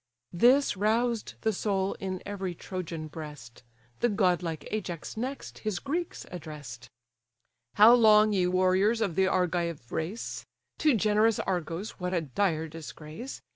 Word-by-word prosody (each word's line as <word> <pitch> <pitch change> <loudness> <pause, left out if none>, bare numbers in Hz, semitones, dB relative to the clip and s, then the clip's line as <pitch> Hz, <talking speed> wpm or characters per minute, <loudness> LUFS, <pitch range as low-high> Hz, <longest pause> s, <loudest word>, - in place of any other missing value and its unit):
This 250 +10 +4
roused 225 +3 0
the 220 -1 +1
soul 195 -1 0
in 185 -2 -4
every 195 -3 -4
Trojan 165 -3 -5
breast: 150 -7 -9 0.4
The 240 - +2
godlike 180 -6 0
Ajax 180 -6 -4
next 255 +5 -5
his 215 -4 -2
Greeks 325 - -3
address'd: 150 -8 -8 0.9
"How 215 +3 +9
long, 215 -3 +6
ye 185 -2 +2
warriors 185 +5 +3
of 205 -6 0
the 190 +3 +3
Argive 170 -8 -1
race, 175 +8 -4 0.4
(To 300 -5 +4
generous 215 +1 +3
Argos 180 +2 -3
what 180 0 -2
a 170 - +1
dire 160 +2 0
disgrace!) 160 - -8
185 Hz, 135 wpm, -29 LUFS, 165-215 Hz, 0.9 s, How